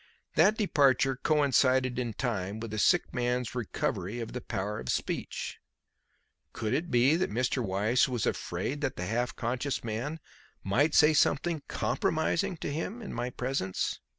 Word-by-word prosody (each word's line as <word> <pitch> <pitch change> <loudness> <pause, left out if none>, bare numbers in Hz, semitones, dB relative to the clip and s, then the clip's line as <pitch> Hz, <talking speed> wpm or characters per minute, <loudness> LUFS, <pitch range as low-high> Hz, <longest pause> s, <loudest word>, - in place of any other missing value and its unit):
That 205 +7 +4
departure 140 - +3
coincided 130 -3 +2
in 120 -3 -2
time 105 -4 -2
with 115 -1 -6
the 110 - -2
sick 175 - +3
man's 125 -1 -1
recovery 105 -3 -2
of 115 -1 -5
the 125 - -4
power 105 -1 -3
of 65 - -7
speech. - - -3 0.9
Could 110 - -2
it 170 +3 -1
be 125 +4 +4
that 185 - 0
Mr. 125 +3 0
Weiss 105 +6 +2
was 120 -4 -1
afraid 145 +3 -2
that 135 -3 -1
the 90 - -4
half 120 +6 -1
conscious 125 +4 -2
man 120 +8 -3 0.4
might 145 +11 +2
say 155 +1 +6
something 155 +2 +2
compromising 165 +3 0
to 145 - -3
him 205 +10 -4
in 200 - -6
my 120 +1 -2
presence? 125 -7 -2
125 Hz, 155 wpm, -29 LUFS, 115-145 Hz, 0.9 s, say